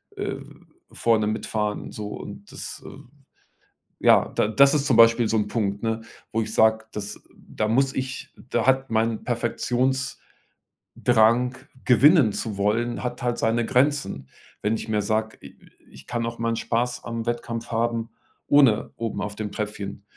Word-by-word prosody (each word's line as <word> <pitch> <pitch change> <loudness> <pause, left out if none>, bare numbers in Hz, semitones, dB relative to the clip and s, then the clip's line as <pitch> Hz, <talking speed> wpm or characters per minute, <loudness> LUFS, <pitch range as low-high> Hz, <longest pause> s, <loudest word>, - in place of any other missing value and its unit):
äh, - - -3 0.6
vorne 110 -2 +2
mitfahren, 105 -1 -2
so.“ 105 -1 -6
Und 100 0 -9
das, - - -7
ähm - - -12 0.9
ja, - - +5
da - - +2
das 140 +7 +5
ist 145 -1 +1
zum 130 - +3
Beispiel 115 0 +6
so 110 - +1
'n 105 -1 0
Punkt, 100 -2 -2
ne, 115 0 -1 0.3
wo 115 - 0
ich - - -4
sage, 110 0 +3
das 105 -1 -6 0.2
da 110 - -4
muss 135 +4 +2
ich 130 0 -5 0.2
da 120 - 0
hat 130 0 +2
mein 110 0 0
Perfektionsdrang, 125 +2 -2 1.3
gewinnen 135 - +6
zu 105 -1 -4
wollen 115 +5 0
hat 125 0 -4
halt 120 -1 0
seine 115 +1 +1
Grenzen. 130 - 0 0.3
Wenn 105 +2 +1
ich 110 - -6
mir 105 -1 +1
sage: 110 +1 -1
„I - - -13 0.3
ich 65 0 -14
kann 120 -1 -2
auch 115 0 -5
meinen 115 0 0
Spaß 120 +2 -1
am 115 -1 -4
Wettkampf 120 -1 -3
haben, 115 0 -1 0.4
ohne 135 -7 +4
oben 115 -3 -3
auf 105 +1 -4
dem 105 -1 -5
Tröpfchen 105 -2 -5
115 Hz, 160 wpm, -24 LUFS, 105-120 Hz, 1.3 s, Beispiel